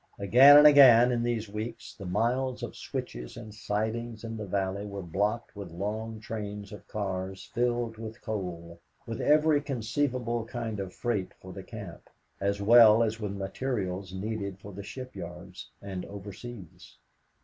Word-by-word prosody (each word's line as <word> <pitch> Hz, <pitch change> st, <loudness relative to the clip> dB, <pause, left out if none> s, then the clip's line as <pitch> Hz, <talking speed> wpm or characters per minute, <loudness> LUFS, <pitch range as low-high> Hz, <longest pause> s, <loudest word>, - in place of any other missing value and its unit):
Again 130 Hz, +8 st, +8 dB
and 150 Hz, -, +8 dB
again 125 Hz, -5 st, +8 dB
in 120 Hz, -1 st, 0 dB
these 120 Hz, -2 st, -1 dB
weeks, 110 Hz, +3 st, -6 dB
the 100 Hz, -, -9 dB
miles 120 Hz, +6 st, 0 dB
of 120 Hz, -, -5 dB
switches -, -, -6 dB
and 110 Hz, -, -9 dB
sidings 110 Hz, +2 st, -3 dB
in 115 Hz, 0 st, -5 dB
the 105 Hz, -2 st, -6 dB
valley 95 Hz, +1 st, -1 dB
were 100 Hz, -2 st, -6 dB
blocked 105 Hz, +8 st, -2 dB
with 100 Hz, -3 st, -7 dB
long 110 Hz, +5 st, -4 dB
trains 105 Hz, -2 st, -6 dB
of 105 Hz, -, -11 dB
cars 95 Hz, -2 st, -4 dB
filled 120 Hz, -2 st, 0 dB
with 110 Hz, 0 st, -7 dB
coal, 85 Hz, -6 st, -5 dB, 0.3 s
with 115 Hz, -2 st, -5 dB
every 150 Hz, 0 st, +4 dB
conceivable 125 Hz, -2 st, -1 dB
kind 115 Hz, -3 st, -4 dB
of 95 Hz, -2 st, -4 dB
freight 110 Hz, -5 st, -2 dB
for 95 Hz, 0 st, -10 dB
the 95 Hz, -, -7 dB
camp, 100 Hz, -4 st, -10 dB, 0.3 s
as 100 Hz, 0 st, -1 dB
well 115 Hz, 0 st, +8 dB
as 110 Hz, 0 st, -2 dB
with 105 Hz, -2 st, -3 dB
materials 95 Hz, -2 st, -3 dB
needed 100 Hz, 0 st, -4 dB
for 100 Hz, +1 st, -11 dB
the 100 Hz, -, -7 dB
shipyards 95 Hz, -6 st, -9 dB
and 95 Hz, -2 st, -5 dB
overseas. 100 Hz, 0 st, -10 dB
105 Hz, 155 wpm, -29 LUFS, 100-120 Hz, 0.3 s, Again